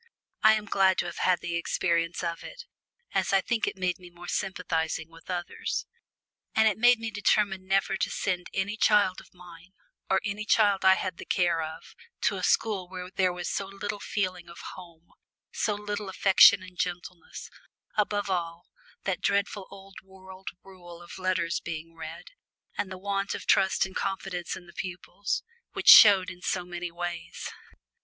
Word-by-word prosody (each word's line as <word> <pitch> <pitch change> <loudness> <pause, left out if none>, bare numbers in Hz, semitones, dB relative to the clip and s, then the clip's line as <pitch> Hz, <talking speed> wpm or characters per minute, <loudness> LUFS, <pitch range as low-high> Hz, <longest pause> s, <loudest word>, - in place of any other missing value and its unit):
I 215 0 +7
am 215 -1 -3
glad 190 -3 +3
to - - 0
have 175 - -6
had 180 -1 +2
the 170 - -4
experience 170 0 0
of 170 0 -3
it, 485 -1 -10 0.5
as - - +1
I 195 - +5
think 225 +3 -1
it - - -3
made 185 -1 -1
me 180 -1 -12
more 175 0 -12
sympathising 165 -5 -2
with 165 +2 -17
others. 175 -1 -3 0.7
And 220 0 +5
it 215 -1 +1
made 245 +1 +6
me 225 0 -5
determine 200 -2 +1
never 195 0 +2
to - - -1
send 180 -2 -2
any 205 +3 -2
child 205 -4 +3
of - - -20
mine, 175 0 -15 0.4
or - - +3
any 205 +1 -3
child 205 -2 +3
I 190 0 +7
had 185 -2 -4
the - - -9
care 175 -2 +2
of, 160 +1 -8 0.3
to - - +1
a - - -5
school 195 -5 +1
where 185 0 -7
there 185 -1 +2
was 175 0 -5
so 195 - -2
little 205 +1 -5
feeling 185 -4 -3
of 170 - -12 0.2
home, 170 -2 -14 0.4
so 210 - -1
little 210 -1 -4
affection 190 0 +6
and 185 -1 -13
gentleness 180 -1 -5 0.4
above 205 -1 0
all, 170 -2 -3 0.4
that 195 -2 -2
dreadful 200 -1 0
old 195 0 -13
world 190 0 -15 0.2
rule 175 -3 -13
of 175 - -10
letters 185 -2 0
being 165 -1 -7
read, 165 - -9 0.4
and 195 - -3
the 185 - -6
want 195 +1 -2
of - - -7
trust 190 0 +3
and 190 - -10
confidence 190 -2 -3
in 180 - -11
the 170 - -15
pupils, 190 +2 -4 0.3
which - - +2
showed 195 -4 +9
in 180 -1 -13
so 180 -1 -1
many 175 0 -5
ways. 170 -1 -6
185 Hz, 180 wpm, -28 LUFS, 175-200 Hz, 0.7 s, showed